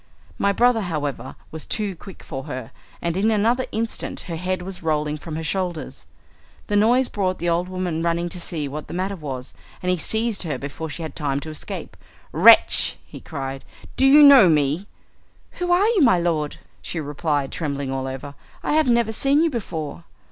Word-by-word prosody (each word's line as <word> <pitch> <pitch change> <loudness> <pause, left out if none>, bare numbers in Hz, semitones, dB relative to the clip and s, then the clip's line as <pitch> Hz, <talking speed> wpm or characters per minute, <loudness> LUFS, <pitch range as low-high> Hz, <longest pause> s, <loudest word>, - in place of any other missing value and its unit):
My 200 - +3
brother, 235 +2 +3
however, 150 -7 -4 0.2
was 160 -1 -6
too 205 -3 -3
quick 190 +2 -12
for 135 0 -6
her, 125 -3 -6 0.3
and 170 -1 -1
in 200 +4 +2
another 230 +4 +2
instant 225 0 -3
her 170 - -6
head 180 +2 -2
was 190 0 -8
rolling 150 -2 0
from 160 +1 -7
her 160 - -4
shoulders. 175 +1 -3 0.6
The 205 - -1
noise 240 +5 +4
brought 185 -2 -1
the 175 - -1
old 175 +2 0
woman 180 -3 -2
running 170 +1 0
to 180 - -6
see 155 -4 -3
what 150 +2 -6
was - - -24
the - - -7
matter, 190 +2 -1 0.7
and 180 - +1
he 180 - +1
seized 220 +5 0
her 155 -7 -3
before 145 +4 -6
she 165 +3 -6
had 160 - -6
time 140 -2 -1
to 155 - -7
escape. 155 - -7 0.4
"Wretch!" - - +6
he - - -11
cried, 135 -1 -6 0.3
"do 270 - +4
you 295 +2 +8
know 270 -10 +9
me?" 150 +5 +1 0.7
"Who 355 0 0
are 360 +3 +4
you, 445 -6 +2
my 235 -9 +6
lord?" 165 -4 -1 0.2
she 170 - -4
replied 145 -1 -1
trembling 140 -4 -3
all 135 0 -2
over. 135 +2 -6 0.3
"I - - 0
have 310 -1 +3
never 235 -2 +3
seen 280 +6 +3
you 330 - +2
before." 160 - -5
175 Hz, 190 wpm, -22 LUFS, 150-215 Hz, 0.7 s, know